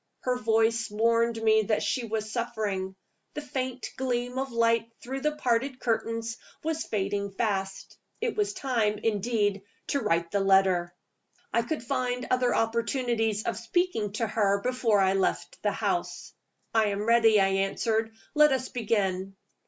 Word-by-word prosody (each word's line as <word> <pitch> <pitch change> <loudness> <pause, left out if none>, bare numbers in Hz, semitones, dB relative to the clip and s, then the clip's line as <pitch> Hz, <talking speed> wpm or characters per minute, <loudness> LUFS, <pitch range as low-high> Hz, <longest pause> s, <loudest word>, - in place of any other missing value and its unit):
Her 250 -1 0
voice 225 0 +2
warned 230 +2 +2
me 220 0 +5
that 215 0 0
she 230 +4 -1
was 215 -1 -3
suffering. 205 -5 -2 0.4
The 300 - -3
faint 255 -2 -4
gleam 250 0 -1
of 270 0 -3
light 230 0 +2
through 265 +2 -5
the 300 +1 0
parted 255 -1 0
curtains 230 0 -1 0.3
was 320 0 -1
fading 200 -1 -1
fast. 195 -2 -3 0.2
It 470 0 -1
was 415 -1 0
time, 235 - 0
indeed, 205 -2 0 0.3
to 280 - +1
write 170 -7 0
the 200 - +1
letter. 190 -3 +3 0.6
I 235 - +3
could 240 +3 -3
find 250 -1 -1
other 255 -1 +2
opportunities 225 -1 0
of - - -2
speaking 230 - -1
to 225 +2 0
her 200 -2 +1
before 245 -3 +2
I 190 0 +3
left 195 - -1
the - - +1
house. - - -2 0.4
"I 220 -1 +4
am 205 0 -1
ready," 225 -1 +5
I 195 0 +4
answered. 220 +3 0 0.2
"Let 300 -1 +6
us 260 -1 -1
begin." 195 -5 -1
225 Hz, 150 wpm, -28 LUFS, 205-250 Hz, 0.6 s, Let